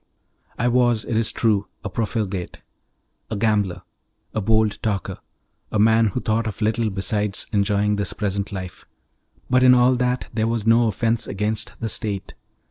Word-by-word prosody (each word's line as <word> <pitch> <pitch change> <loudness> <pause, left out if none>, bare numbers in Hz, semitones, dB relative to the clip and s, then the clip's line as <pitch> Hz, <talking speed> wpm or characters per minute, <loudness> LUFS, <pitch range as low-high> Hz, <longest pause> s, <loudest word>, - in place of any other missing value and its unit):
I 120 - +1
was, 120 -2 +2
it 115 - -2
is 110 0 +2
true, 105 -4 +1 0.2
a 105 - -3
profligate, 105 -5 -3 0.7
a 110 - -3
gambler, 105 -3 0 0.5
a 110 - -1
bold 110 +1 +2
talker, 100 -4 -2 0.5
a - - 0
man 110 +1 +4
who 105 - -2
thought 110 +1 0
of 110 - -5
little 110 +1 +1
besides 105 +1 -1
enjoying 105 0 +2
this 100 -2 0
present 100 -1 -2
life, 95 -2 -7 0.6
but 130 0 +3
in 125 0 +7
all 125 +1 +4
that 125 0 -1
there 110 -1 0
was 115 -2 -1
no 115 +1 +4
offence 115 0 0
against 110 +4 -2
the 115 - -2
state. 100 -2 -3
110 Hz, 160 wpm, -22 LUFS, 100-115 Hz, 0.7 s, in